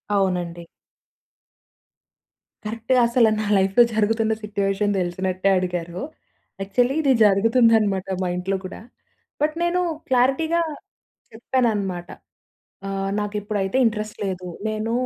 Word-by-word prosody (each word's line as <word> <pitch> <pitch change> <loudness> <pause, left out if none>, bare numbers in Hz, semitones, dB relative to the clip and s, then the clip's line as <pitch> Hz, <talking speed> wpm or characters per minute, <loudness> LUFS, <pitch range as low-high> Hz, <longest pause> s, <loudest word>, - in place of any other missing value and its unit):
అవునండి. 175 -3 -1 2.0
కరెక్ట్‌గా 230 +4 0
అసల 235 -1 +4
నా 215 - -2
లైఫ్‌లో 195 +5 +4
జరుగుతున్న 220 +1 +1
సిట్యుయేషన్ 205 0 -1
తెలిసినట్టే 185 +2 -1
అడిగారు. 175 -1 -3 0.6
యాక్చువల్లీ 245 +7 +1
ఇది 280 -3 +3
జరుగుతుందనమాట 215 -1 +3 0.2
మా - - -1
ఇంట్లో 185 +2 -2
కూడా. 185 - -8 0.6
బట్, 305 +1 +1
నేను 350 +1 +1 0.3
క్లారిటీగా 270 +7 +2 0.7
చెప్పాననమాట. 215 -7 -1 0.8
ఆహ్, 195 0 -2
నాకిప్పుడైతే 205 0 -2
ఇంట్రెస్ట్ 215 -1 -3
లేదు. 185 -1 -4 0.2
నేను 215 +1 -2
210 Hz, 95 wpm, -22 LUFS, 190-230 Hz, 2.0 s, అసల